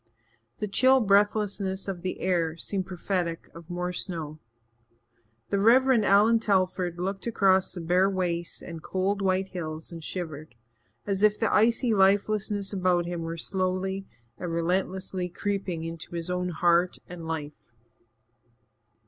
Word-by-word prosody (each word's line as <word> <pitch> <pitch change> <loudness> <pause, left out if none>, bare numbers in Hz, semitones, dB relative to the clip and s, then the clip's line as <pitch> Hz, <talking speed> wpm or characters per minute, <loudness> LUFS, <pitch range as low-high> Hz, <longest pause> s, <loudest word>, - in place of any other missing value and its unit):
The 210 - -3
chill 260 +6 +5
breathlessness 200 -2 +1
of 185 -3 -4
the 185 +1 -4
air 170 -3 0
seemed 190 +1 -3
prophetic 180 -2 -3
of 165 0 -12
more 180 0 -3
snow. 160 -4 -5 1.1
The 200 - +2
Reverend 240 +1 +5
Allan 215 +4 +5
Telford 185 -4 0
looked 195 +4 -3
across 190 -4 +3
the 180 - -5
bare 180 +3 +3
wastes 175 -3 -2
and 165 -2 -8
cold 195 +4 -1
white 190 0 +1
hills 160 -2 -6
and 165 -1 -8
shivered, 155 -6 -6 0.5
as 195 -1 -1
if 210 0 +4
the 225 - +1
icy 230 +2 +3
lifelessness 200 +1 +2
about 180 -2 +2
him 175 -1 -4
were 165 0 -4
slowly 190 +2 -2 0.3
and 175 -2 -4
relentlessly 180 +2 -1
creeping 190 -2 -3
into 165 +1 -7
his 170 +1 -3
own 180 0 -1
heart 175 +1 +2
and 170 -2 -8
life. 155 -2 -6
185 Hz, 140 wpm, -27 LUFS, 170-200 Hz, 1.1 s, chill